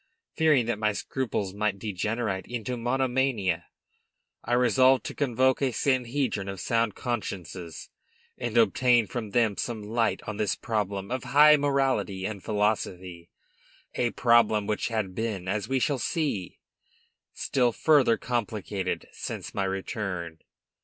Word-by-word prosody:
Fearing 150 -7 +4
that 115 -2 -2
my 105 -1 +1
scruples 105 -5 -3
might 105 -1 -1
degenerate 105 0 -2
into 120 +1 -4
monomania, 125 -6 0 0.8
I 120 - -2
resolved 130 0 +4
to - - -4
convoke 130 -1 +1
a 135 -2 +2
sanhedrim 125 -4 0
of 95 -1 -5
sound 115 +1 0
consciences, 95 -8 -5 0.4
and 120 -1 -3
obtain 120 +1 +4
from 110 +2 -5
them 110 -1 +1
some 115 -3 -3
light 115 +2 0
on 110 -3 -5
this 105 -4 0
problem 100 -2 -3
of 130 0 -3
high 150 +2 +7
morality 135 -9 0
and 100 -2 -5
philosophy, 95 -5 -2 0.6
a 120 - 0
problem 115 -3 +3
which 105 0 -1
had 110 -5 -2
been, 105 -3 -3
as 105 +2 -2
we 135 - +1
shall 135 +1 0
see, 140 - -2 0.8
still 125 -3 +1
further 135 -3 +4
complicated 105 -5 -3
since - - -6
my 100 - -1
return. 95 -4 -4
110 Hz, 130 wpm, -27 LUFS, 100-125 Hz, 0.8 s, high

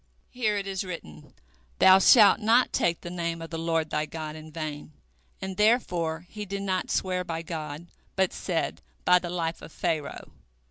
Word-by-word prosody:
Here 215 -4 0
it 200 - -3
is 195 -1 -3
written, 80 - -9 0.5
Thou 190 0 +7
shalt 210 +1 +7
not 230 +3 +3
take 170 -1 +1
the 175 - -7
name 170 -1 -3
of 165 0 -8
the 165 - -4
Lord 165 -1 -1
thy 150 0 -1
God 155 -1 -6
in 155 0 -10
vain, 155 -1 -6 0.5
and 190 -1 -5
therefore 180 -7 +1
he 210 +3 -7
did 200 0 -4
not 185 -2 -1
swear 185 -1 0
by 165 -1 -4
God, 155 -1 -6 0.3
but 190 -1 +1
said, - - -2 0.2
By 180 0 +6
the 175 - -6
life 170 -1 -3
of - - -11
Pharaoh. 160 -4 -3
170 Hz, 180 wpm, -27 LUFS, 160-190 Hz, 0.5 s, Thou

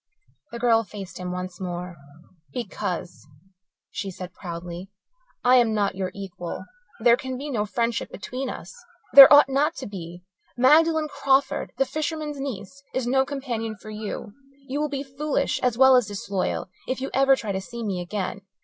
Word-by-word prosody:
The 235 - -5
girl 230 -1 +3
faced 200 -4 -9
him 180 0 -4
once 180 0 -6
more. 180 -1 -5 0.6
"Because," 180 -7 -5 0.6
she 195 - -4
said 185 -1 -8
proudly, 175 +1 -7 0.5
"I 250 +1 +6
am 230 -3 +3
not 205 -2 +1
your 185 -1 -3
equal. 190 -3 -6 0.4
There 235 +1 +6
can 260 0 -5
be 285 +2 -5
no 210 -4 -1
friendship 230 +1 -1
between 255 +6 -5
us. - - -8 0.4
There 275 -1 +12
ought 290 -1 +9
not 285 +4 +1
to - - -6
be. 175 -3 -8 0.3
Magdalen 310 +4 +5
Crawford, 275 -1 +1
the 270 - +3
fisherman's 305 0 -3
niece, 270 -1 -6
is 260 -2 0
no 265 +2 +3
companion 240 -6 -4
for 215 +1 -11
you. 210 0 -6 0.3
You 285 +3 -2
will 300 - 0
be 280 -1 -3
foolish, 280 +1 -1
as 245 -2 +1
well 265 0 +7
as 250 -4 +3
disloyal, 195 -2 -3 0.2
if 255 - -2
you 270 - -4
ever 270 0 +5
try 220 -5 -4
to 190 0 -2
see 235 +4 -7
me 190 -4 -2
again. 190 +1 -4
235 Hz, 170 wpm, -25 LUFS, 190-270 Hz, 0.6 s, There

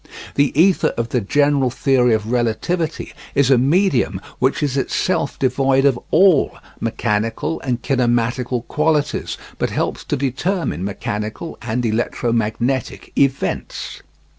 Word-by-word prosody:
The 140 -1 +2
ether 185 +2 +4
of 115 0 -1
the 125 - 0
general 140 +4 +2
theory 125 -2 +2
of 110 +1 -3
relativity 155 +8 -1 0.2
is 140 -1 +3
a 130 - +6
medium 140 - +2 0.2
which 130 +4 +1
is 140 -2 0
itself 140 +2 0
devoid 135 +1 +2
of 135 -4 +3
all 180 -2 +4 0.2
mechanical 115 +9 -1
and 125 -3 -2
kinematical 120 -1 0
qualities, 150 -1 0 0.2
but - - 0
helps - - -2
to - - -1
determine 140 - -1
mechanical 105 - -4
(and 120 +2 -2
electromagnetic) 115 +2 -1
events. 140 -1 -1
130 Hz, 120 wpm, -20 LUFS, 115-145 Hz, 0.2 s, a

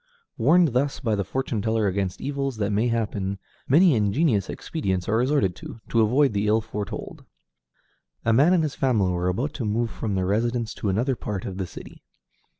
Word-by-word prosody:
Warned 160 +8 +4
thus 135 +3 0
by 115 -5 -1
the 100 -1 0
fortune 115 +1 -2
teller 110 0 0
against 95 -1 -1
evils 135 -3 -3
that 105 -1 -1
may 105 +4 +1
happen, 105 -4 -2 0.3
many 165 +4 +5
ingenious 105 - +1
expedients 95 - -3
are 110 - +1
resorted 125 - +1
to, 115 - -9
to 115 - +3
avoid 130 +4 +3
the 100 +1 0
ill 110 +1 +4
foretold. 105 -2 -6 1.0
A 115 - +3
man 145 +9 +5
and 175 -3 +3
his 150 - -2
family 110 -9 +1
were 90 0 -1
about 125 +11 -2
to 130 - -4
move 110 +2 -1
from 105 -3 -3
their 95 -1 0
residence 115 +3 0
to 105 - -3
another 120 +7 +1
part 100 -5 -5
of 95 0 -5
the 95 - -2
city. - - -11
110 Hz, 190 wpm, -24 LUFS, 100-135 Hz, 1.0 s, many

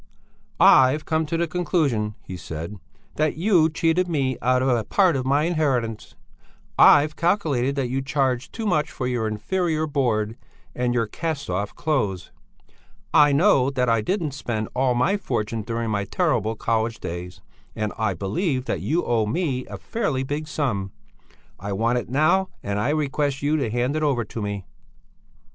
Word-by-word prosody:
"I've 135 +4 +6
come 160 -1 0
to 165 - -1
the 170 - +1
conclusion," 150 - 0
he 95 - -7
said, 85 +3 -7 0.4
"that 155 0 +1
you 170 -3 +4
cheated 165 +3 +1
me 135 -6 0
out 125 +1 +2
of - - +1
a 120 -3 +2
part 185 - +3
of 130 -1 -2
my 140 +2 +3
inheritance; 135 -10 -1 0.6
I've 150 +1 +6
calculated 150 -8 +1
that 135 -3 -1
you 130 +2 -2
charged 135 -3 -1
too 225 - -5
much 155 -6 +1
for 130 - -5
your 120 -3 -1
inferior 155 - -1
board 120 -7 0 0.4
and 125 0 -1
your 115 -2 +2
cast 155 - -4
off 100 +3 -3
clothes; 105 - -1 0.8
I 145 -1 +6
know 140 -3 +4
that 125 -3 0
I 115 -1 +3
didn't 170 - -1
spend 120 -5 -4
all 130 -1 +2
my 170 +12 +2
fortune 115 - -2
during 115 +1 -3
my 100 -1 -1
terrible 115 - 0
college 115 +1 -1
days, 90 +1 -6 0.4
and 105 -1 -2
I 110 -4 -1
believe 130 - -1
that - - -2
you 170 +4 0
owe 115 -3 +1
me 135 - -1
a - - -7
fairly 155 - -2
big 145 +3 -4
sum; 120 -11 -2 0.7
I 100 +1 -4
want 115 +5 +1
it - - -8
now, 175 +8 +2
and 100 0 -2
I 125 - 0
request 145 -2 -1
you 150 +2 +2
to 135 -7 -1
hand 120 +5 -1
it 155 - -1
over 140 -6 +1
to 110 - -6
me." 100 -2 -4
130 Hz, 170 wpm, -23 LUFS, 110-155 Hz, 0.8 s, I've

